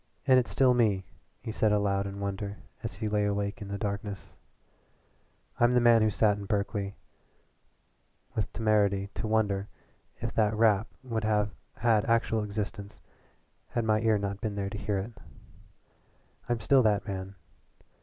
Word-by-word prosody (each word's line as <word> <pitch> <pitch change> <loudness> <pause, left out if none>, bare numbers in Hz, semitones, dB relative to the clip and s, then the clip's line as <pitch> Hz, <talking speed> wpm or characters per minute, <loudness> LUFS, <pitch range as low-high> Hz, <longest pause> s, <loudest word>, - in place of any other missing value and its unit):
"And 130 -2 +6
it's 125 - -2
still 130 -2 +4
me," 105 -6 +2 0.4
he 110 - -4
said 110 -1 +2
aloud 100 -1 +1
in 100 0 -7
wonder 100 +1 -4 0.2
as - - -5
he 110 +2 -3
lay 105 0 +1
awake 100 +1 -2
in 105 - -6
the 100 0 -4
darkness. 100 -1 -5 1.2
"I'm 120 +1 +4
the - - +6
man 120 -1 +6
who 110 - +4
sat 105 0 +2
in 100 - -6
Berkeley 100 0 -2 1.4
with 105 -4 -2
temerity 100 -3 +1
to 115 - -3
wonder 105 -2 +1 0.5
if - - -3
that 110 -1 +2
rap 110 -1 +4 0.2
would 115 -4 -3
have 105 -1 +1 0.2
had 110 -1 +3
actual 115 -1 +2
existence 100 -1 -5 0.7
had 120 -2 -1
my 110 -1 +2
ear 110 -2 +3
not 100 -1 -4
been 105 -2 -2
there 100 -1 -3
to 105 - -5
hear 105 -1 -1
it. 100 +5 -4 1.4
I'm 120 -2 0
still 135 +2 +5
that 105 -3 +2
man. 95 -1 -5
105 Hz, 160 wpm, -29 LUFS, 100-110 Hz, 1.4 s, And